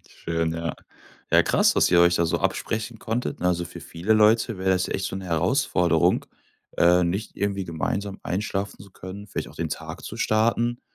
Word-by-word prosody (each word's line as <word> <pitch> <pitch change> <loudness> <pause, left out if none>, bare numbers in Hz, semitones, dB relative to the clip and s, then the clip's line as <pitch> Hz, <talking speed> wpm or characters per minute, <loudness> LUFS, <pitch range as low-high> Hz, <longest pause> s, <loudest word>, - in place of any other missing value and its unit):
Schön, 85 -1 -2
ja. 85 0 -3 0.6
Ja, - - +7
krass, - - +3
dass - - +3
ihr 85 - +6
euch 85 0 +5
da 85 - +2
so 80 - 0
absprechen 110 0 -2
konntet, 115 +3 -3
ne? 90 - 0
Also, 85 -1 0
für 85 0 -10
viele 85 +7 -1
Leute 110 0 +4
wär 95 0 -1
das 95 -1 +2
echt 95 - -2
so 95 - -4
'ne 95 - -6
Herausforderung, 90 - +2 0.5
äh, 90 +1 +5
nicht 95 +6 -3
irgendwie 100 -1 -1
gemeinsam 95 +4 -3
einschlafen 100 +1 -3
zu 100 - -15
können, 95 +2 -9
vielleicht - - -5
auch - - -15
den - - -2
Tag - - -7
zu - - -7
starten. 115 +2 +1
95 Hz, 190 wpm, -24 LUFS, 85-105 Hz, 0.6 s, Ja